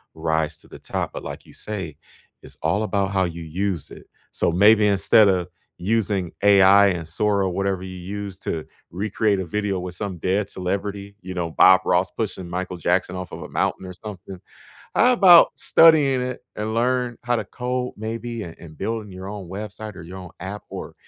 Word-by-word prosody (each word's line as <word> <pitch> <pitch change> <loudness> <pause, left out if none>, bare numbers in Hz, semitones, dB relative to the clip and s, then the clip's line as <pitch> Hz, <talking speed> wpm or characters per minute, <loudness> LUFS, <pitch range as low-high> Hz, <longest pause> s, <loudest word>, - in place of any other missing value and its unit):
rise 80 -1 -1
to - - -13
the - - -12
top. - - -4
But - - -7
like - - -8
you - - -17
say, 95 -8 -5 0.5
it's - - -13
all 105 +2 +1
about 100 -2 0
how 95 -1 +2
you 85 -1 -6
use 90 +1 -3
it. - - -13 0.2
So, - - 0
maybe 105 +5 +5
instead 100 +2 +5
of 90 -3 +1 0.3
using 100 -3 0
AI 100 0 +7
and 85 -4 -2
Sora, 100 +2 +1
whatever 95 0 -1
you 95 0 -7
use 100 +1 -6
to 80 -4 -4 0.3
recreate 100 +2 0
a 95 - -3
video 100 +2 -2
with 90 -1 -6
some 95 -1 -4
dead 95 +4 0
celebrity, 100 +2 -4
you 95 0 -7
know, 85 -2 -2
Bob 95 +3 +6
Ross 90 +2 +2
pushing 95 -5 -4
Michael 90 +1 -4
Jackson 90 +2 0
off 90 -2 -6
of - - -8
a - - -7
mountain - - -1
or 90 - -7
something, 95 -1 -9 0.5
how 250 0 +4
'bout 180 -6 +8
studying 150 -5 +5
it 125 0 -5
and 110 +1 -3
learn 125 0 0
how 120 - +1
to - - -2
code 125 0 -3
maybe 115 +1 -5
and 85 - -10
and 80 -2 -13
building 110 -2 -3
your 95 +1 -8
own 100 -3 -7
website 105 +1 -7
or - - -9
your 90 +3 -9
own 90 -1 -10
app 95 +3 -6
or - - -8
100 Hz, 195 wpm, -23 LUFS, 90-105 Hz, 0.5 s, bout